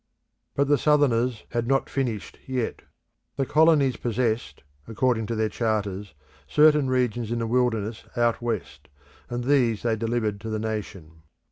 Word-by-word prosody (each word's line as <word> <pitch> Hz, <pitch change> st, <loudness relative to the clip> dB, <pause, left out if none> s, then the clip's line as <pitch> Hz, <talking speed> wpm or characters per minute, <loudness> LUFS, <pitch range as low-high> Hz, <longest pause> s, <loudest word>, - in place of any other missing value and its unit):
But 140 Hz, 0 st, +2 dB
the 145 Hz, -1 st, +3 dB
Southerners 125 Hz, -6 st, +2 dB
had 120 Hz, -1 st, -2 dB
not 135 Hz, +1 st, +2 dB
finished 120 Hz, -7 st, -3 dB
yet. 130 Hz, -3 st, -2 dB, 0.5 s
The 135 Hz, -, 0 dB
colonies 150 Hz, -3 st, +4 dB
possessed, 115 Hz, -, -2 dB, 0.2 s
according 115 Hz, -1 st, 0 dB
to 115 Hz, -, -2 dB
their 110 Hz, 0 st, +1 dB
charters, 105 Hz, -4 st, -2 dB, 0.3 s
certain 150 Hz, -, +4 dB
regions 120 Hz, -3 st, 0 dB
in 120 Hz, -, 0 dB
the 115 Hz, -, -1 dB
wilderness 115 Hz, -2 st, 0 dB
out 120 Hz, 0 st, +2 dB
west, 115 Hz, -5 st, -4 dB, 0.4 s
and 120 Hz, 0 st, -3 dB
these 120 Hz, -5 st, +2 dB
they 115 Hz, -2 st, +1 dB
delivered 110 Hz, -2 st, -1 dB
to 110 Hz, -, -5 dB
the 110 Hz, -, -1 dB
nation. 95 Hz, -7 st, -5 dB
120 Hz, 145 wpm, -25 LUFS, 110-130 Hz, 0.5 s, colonies